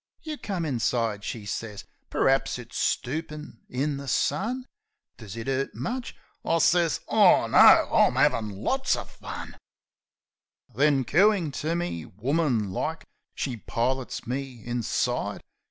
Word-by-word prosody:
"You 310 -1 -4
come 185 -5 -3
inside," 115 -5 -1
she 110 -1 -5
sez. 105 0 -5 0.3
"Per'aps 135 -1 +2
it's 120 -2 -11
stoopin' 150 -1 -3
in 140 +3 -1
the 140 0 -8
sun. 245 - 0 0.5
Does 110 -1 -9
it 115 - -6
'urt 135 0 -1
much?" 250 +1 -4 0.3
I 165 - +1
sez, 165 -1 +3
"Oh, - - +5
no; - - +3 0.3
I'm - - +4
'avin' 110 -2 +2
lots 260 - 0
o' - - -4
fun." - - -8
18 - - -14
Possum - - -18 1.2
Then, 145 -2 +4
cooin' 185 - +3
to 155 +4 -2
me, 170 - -3
woman 120 - 0
like, 160 +11 -3 0.3
she 130 -4 -3
pilots 125 +4 -2
me 130 -2 -5
inside. 120 -1 -2
135 Hz, 140 wpm, -26 LUFS, 115-165 Hz, 1.2 s, Oh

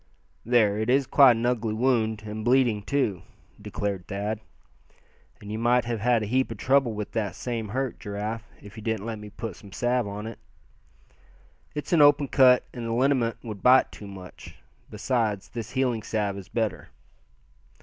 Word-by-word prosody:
"There, 110 -3 +3
it 110 +2 -1
is 135 +2 +3
quite 135 0 +6
an 115 +1 -2
ugly 115 -3 0
wound, 110 -3 +1
and 110 0 -5
bleeding 120 -3 +3
too," 105 - -1 0.4
declared 100 -4 -4
Thad. 105 +2 -3 1.0
"And 105 - -9
you 110 - -3
might 120 +1 +3
have 115 -2 -2
had 115 0 +2
a - - -2
heap 130 +5 +1
of - - -6
trouble 130 -3 +2
with 105 -1 -5
that 105 -3 -2
same 115 -3 -4
hurt, 130 +4 -3
Giraffe, 105 +2 -5
if 105 -1 -12
you - - -7
didn't 110 -1 -2
let 115 -2 -4
me 105 0 -9
put 105 -2 -7
some 100 - -14
salve 120 +2 0
on. 105 +2 -6 1.4
It's 150 +3 -3
an 165 - +5
open 145 -1 +5
cut 125 -2 +5
and 120 -2 -5
the 115 - -2
liniment 125 -2 +1
would 105 -5 -7
bite 130 +1 +5
too 105 - -10
much. 95 -2 -11 0.3
Besides 105 -2 -1
this 115 -2 -6
healing 125 -4 0
salve 105 -2 -2
is 100 -2 -9
better." 110 -2 -2
115 Hz, 175 wpm, -26 LUFS, 105-125 Hz, 1.4 s, quite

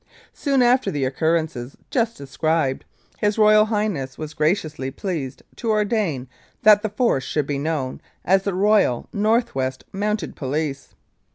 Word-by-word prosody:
Soon 275 -3 +1
after 245 -3 +3
the 145 -6 -1
occurrences 150 -2 -1
just 230 -3 0
described, 140 0 -1 0.3
His 210 0 +1
Royal 215 0 +6
Highness 205 - -2
was 155 0 -6
graciously 155 -4 0
pleased 140 -5 -5
to 230 - -3
ordain 210 - 0 0.4
that 210 -1 +7
the 215 - -2
Force 210 - +1
should 150 +1 -1
be 140 -1 -2
known 145 -4 -2 0.2
as 190 +2 +4
the 195 -1 -2
Royal 200 - +3
North 225 +3 +1
West 130 0 -2
Mounted 205 -3 -2
Police. 140 0 -3
165 Hz, 145 wpm, -22 LUFS, 140-215 Hz, 0.4 s, that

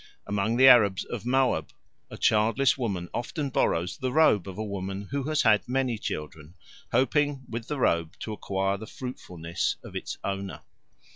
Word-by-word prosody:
Among 105 +3 0
the 130 +1 +7
Arabs 105 -7 +6
of 120 -1 -6
Moab 125 - +2 0.4
a - - -9
childless 115 +5 +3
woman 100 -9 -3
often 140 +3 -3
borrows 90 -5 0
the 130 -2 -1
robe 125 - +4
of 95 - -7
a 110 - -2
woman 100 0 -5
who 140 -1 -2
has 155 0 +1
had 110 0 +3
many 125 -3 0
children, 75 -1 -6 0.4
hoping 145 0 +1
with 115 0 -6
the 150 - -3
robe 85 -7 +1
to 110 - -4
acquire 95 -1 -1
the 110 +2 -9
fruitfulness 90 -10 -4
of - - -11
its - - -4
owner. 100 -1 -4
110 Hz, 165 wpm, -27 LUFS, 95-130 Hz, 0.4 s, the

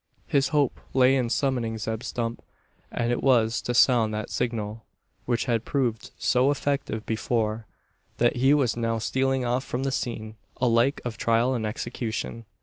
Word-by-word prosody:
His 140 -1 +2
hope 145 -4 +1 0.2
lay 130 0 +5
in 125 -3 0
summoning 120 -4 0
Zeb 110 +1 -3
Stump, 115 -2 -3 0.5
and 120 +1 -1
it 120 - 0
was 120 -3 +3
to 120 - -2
sound 115 -3 +5
that 110 - -4
signal 110 -2 -2 0.4
which 120 -2 0
had 115 -3 0
proved 120 -6 -1
so 125 +2 +3
effective 140 -6 -1
before 110 -1 -1 0.5
that 120 +1 +2
he 135 +4 +5
was 135 -6 +1
now 115 -1 -1
stealing 130 +3 0
off 125 +2 0
from 130 -1 -3
the 135 - 0
scene, 110 -4 -4 0.2
alike 120 +2 +2
of 115 -3 -4
trial 115 +3 +2
and 110 -4 -1
execution. 115 0 -4
120 Hz, 160 wpm, -26 LUFS, 115-130 Hz, 0.5 s, lay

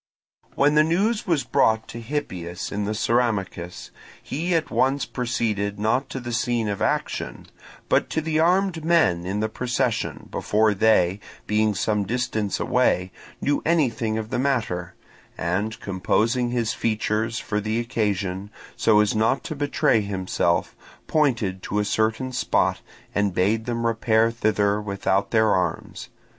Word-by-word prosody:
When 145 +1 +3
the 150 0 +6
news 200 +8 +1
was 165 -6 +2
brought 110 0 +2
to 115 - -7
Hippias 95 - -4
in 105 0 -2
the 105 +1 -2
Ceramicus, 105 -7 -1 0.3
he 170 +5 -1
at 160 -2 -1
once 135 +2 +1
proceeded 110 -5 -2
not 115 +6 0
to 135 - -4
the 120 -1 -6
scene 120 -1 0
of 100 -1 -3
action, - - -2 0.4
but - - +2
to - - 0
the 155 0 -1
armed 180 0 +2
men 155 - +2
in 100 +3 -1
the 110 - +1
procession, 125 +2 -2
before 110 0 +2
they, 100 -3 +3 0.3
being 105 0 +1
some 105 +2 0
distance 110 -2 -1
away, 90 +1 +1 0.3
knew 145 0 +1
anything 120 -9 +1
of 110 0 -5
the - - 0
matter, 115 -10 -1 0.4
and 95 +6 -2
composing 115 +6 0
his 120 -3 0
features 110 0 -1
for 105 - -2
the 110 +2 -1
occasion, 100 -5 -2 0.3
so 110 -2 +4
as 105 - +1
not 110 +5 +2
to 155 - -5
betray 140 -5 +2
himself, 95 -3 -1 0.3
pointed 115 -11 +1
to 105 - -3
a 105 - +1
certain 110 +5 0
spot, 125 - +1 0.3
and 100 -2 0
bade 110 +5 +1
them 115 -1 -1
repair 115 0 +2
thither 105 -2 +1
without 100 -1 0
their 110 -2 +3
arms. 90 - -2
110 Hz, 150 wpm, -24 LUFS, 100-125 Hz, 0.4 s, the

